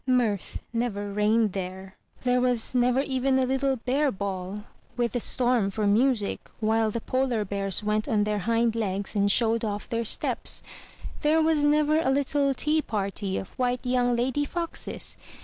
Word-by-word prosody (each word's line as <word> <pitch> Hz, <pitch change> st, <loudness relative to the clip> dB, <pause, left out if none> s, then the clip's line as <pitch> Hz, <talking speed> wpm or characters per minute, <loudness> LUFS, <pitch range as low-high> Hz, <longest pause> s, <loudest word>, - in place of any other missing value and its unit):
Mirth 235 Hz, -7 st, 0 dB
never 205 Hz, -4 st, -2 dB
reigned 210 Hz, 0 st, +2 dB
there; 190 Hz, 0 st, -6 dB, 0.3 s
there 250 Hz, 0 st, +2 dB
was 245 Hz, -2 st, 0 dB
never 250 Hz, +1 st, +3 dB
even 265 Hz, -1 st, +1 dB
a 260 Hz, -, +2 dB
little 265 Hz, +1 st, +1 dB
bear 265 Hz, +4 st, 0 dB
ball, 195 Hz, +1 st, -4 dB, 0.3 s
with 240 Hz, -2 st, +1 dB
the 245 Hz, -, -1 dB
storm 240 Hz, -4 st, +1 dB
for 210 Hz, +2 st, -2 dB
music, 220 Hz, +1 st, +1 dB
while 220 Hz, 0 st, +2 dB
the 235 Hz, -, -3 dB
polar 255 Hz, -4 st, 0 dB
bears 195 Hz, 0 st, -2 dB
went 210 Hz, 0 st, 0 dB
on 210 Hz, -3 st, +2 dB
their 210 Hz, 0 st, -1 dB
hind 230 Hz, 0 st, +2 dB
legs 200 Hz, -3 st, -1 dB
and 200 Hz, 0 st, +3 dB
showed 230 Hz, +1 st, +2 dB
off 205 Hz, -2 st, -3 dB
their 230 Hz, -1 st, -1 dB
steps; 225 Hz, -, 0 dB, 0.6 s
there 310 Hz, +1 st, +3 dB
was 315 Hz, -2 st, +2 dB
never 300 Hz, +1 st, +3 dB
a 295 Hz, -, +1 dB
little 280 Hz, +1 st, +1 dB
tea 305 Hz, +4 st, +2 dB
party 200 Hz, -4 st, -3 dB
of 190 Hz, -, -5 dB
white 250 Hz, 0 st, 0 dB
young 245 Hz, -1 st, +2 dB
lady 260 Hz, +4 st, 0 dB
foxes! 335 Hz, +3 st, -1 dB
235 Hz, 165 wpm, -26 LUFS, 205-260 Hz, 0.6 s, never